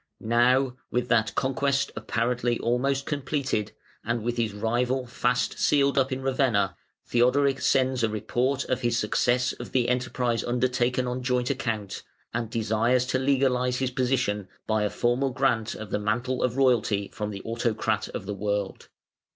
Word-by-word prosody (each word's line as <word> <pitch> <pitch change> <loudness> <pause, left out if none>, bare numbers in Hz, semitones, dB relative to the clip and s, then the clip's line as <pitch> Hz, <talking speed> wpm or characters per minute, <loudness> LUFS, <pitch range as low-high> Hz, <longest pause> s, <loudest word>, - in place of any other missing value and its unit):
Now, 125 +3 +2
with 125 0 -1
that 110 -2 +2
conquest 140 +1 0
apparently 120 +2 -1
almost 135 +3 0
completed, 140 -6 -2 0.3
and 120 -1 -2
with 120 +1 -2
his 115 -2 0
rival 120 +5 0
fast 125 +1 -1
sealed 140 -1 +3
up 135 0 +2
in 130 0 -3
Ravenna, 130 -7 +1 0.3
Theodoric 135 +3 +2
sends 130 -1 +2
a 115 - +2
report 120 +6 -1
of 130 - -1
his 120 -1 +1
success 120 +3 +1
of - - -9
the 125 -2 +2
enterprise 125 -2 0
undertaken 125 +1 0
"on 125 +1 -3
joint 125 0 0
account", 110 -7 -3 0.3
and 115 -1 -2
desires 115 +3 +1
to 130 0 0
legalise 130 -2 +2
his 130 -1 -1
position 125 -6 0 0.2
by 110 -1 +1
a 105 - +1
formal 120 +6 +1
grant 125 -4 0
of 110 -1 -8
the - - 0
mantle 120 +5 -1
of 125 0 0
royalty 115 -6 +2
from 105 -1 -3
the 100 -2 -7
Autocrat 115 -2 -1
of 95 - -6
the 105 - -3
World. 100 -1 -3
125 Hz, 160 wpm, -26 LUFS, 110-130 Hz, 0.3 s, sealed